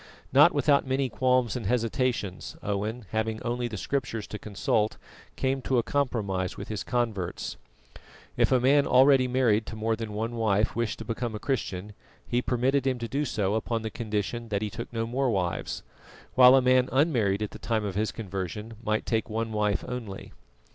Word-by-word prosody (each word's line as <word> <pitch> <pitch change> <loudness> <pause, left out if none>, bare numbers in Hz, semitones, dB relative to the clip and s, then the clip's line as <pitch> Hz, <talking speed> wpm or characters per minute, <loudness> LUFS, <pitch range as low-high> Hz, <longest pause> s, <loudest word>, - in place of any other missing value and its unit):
Not - - +8
without 140 -2 +3
many 130 0 0
qualms 125 -2 +2
and 125 - -3
hesitations, 115 -4 -1
Owen, 105 +3 -2
having 110 0 -1
only 120 0 -1
the 110 -2 -6
Scriptures 115 -2 -2
to 105 - -6
consult, 105 +1 0 0.4
came 135 0 0
to 130 0 0
a 120 - +3
compromise 105 -9 -1
with - - -7
his 110 -1 -3
converts. 115 -7 -2 0.8
If - - +2
a 130 - +5
man 140 +3 +4
already 130 0 +6
married 120 -4 +2
to - - -6
more 110 +1 0
than 110 -1 -6
one 115 +3 -3
wife 105 -2 +1
wished 115 -1 -1
to 115 - -8
become 115 0 -3
a - - -4
Christian, 105 -7 -3 0.3
he 120 0 +1
permitted 130 +2 +1
him 130 -1 +1
to 115 -1 -4
do 145 +5 -1
so 105 -6 0
upon 115 +1 -1
the 110 - -3
condition 115 +1 -3
that 100 0 -1
he 105 - -3
took 115 +1 -6
no 115 -1 -2
more 130 +3 0
wives; 90 -6 -2 0.5
while 130 0 +8
a 135 - +4
man 130 0 +4
unmarried 120 - +2
at 105 - -4
the - - -10
time 110 -2 -1
of 100 - -3
his 105 +3 0
conversion 105 +1 -5
might 110 -1 0
take 115 -1 -1
one 110 +1 -2
wife 105 -1 0
only. 115 -6 -6
115 Hz, 190 wpm, -27 LUFS, 105-125 Hz, 0.8 s, Not